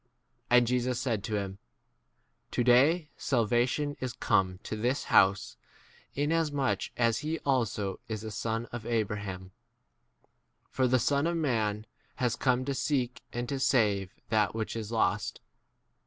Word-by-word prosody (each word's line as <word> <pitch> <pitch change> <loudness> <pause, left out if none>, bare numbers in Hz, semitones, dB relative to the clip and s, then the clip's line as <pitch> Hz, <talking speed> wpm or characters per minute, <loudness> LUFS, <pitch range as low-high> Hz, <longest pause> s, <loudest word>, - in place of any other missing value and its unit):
9 125 - +6
And 120 - +5
Jesus 125 0 0
said 115 -6 -1
to 110 - -2
him, 100 -1 -4 0.9
To 120 - 0
day 145 +7 +4
salvation 125 +4 +1
is 130 -2 -3
come 95 -6 +1
to - - -4
this 125 +6 0
house, 95 0 +4 0.6
inasmuch 145 -2 0
as 115 -2 +2
he 155 +2 -2
also 110 -8 0
is 110 -1 -4
a 110 - -5
son 115 +2 -2
of 120 - -5
10 115 - -6
Abraham; 100 -4 -3 1.2
for 130 -1 +2
the 130 +1 +4
Son 140 +4 +1
of 170 0 0
man 110 -8 0 0.3
has 125 -3 0
come 130 -1 +1
to 140 - -1
seek 130 -2 -1
and 120 0 -3
to 135 +1 -2
save 105 -8 +2 0.2
that 105 -3 +2
which 110 0 -3
is 110 -1 -5
lost. 105 -2 0
120 Hz, 150 wpm, -29 LUFS, 105-130 Hz, 1.2 s, 9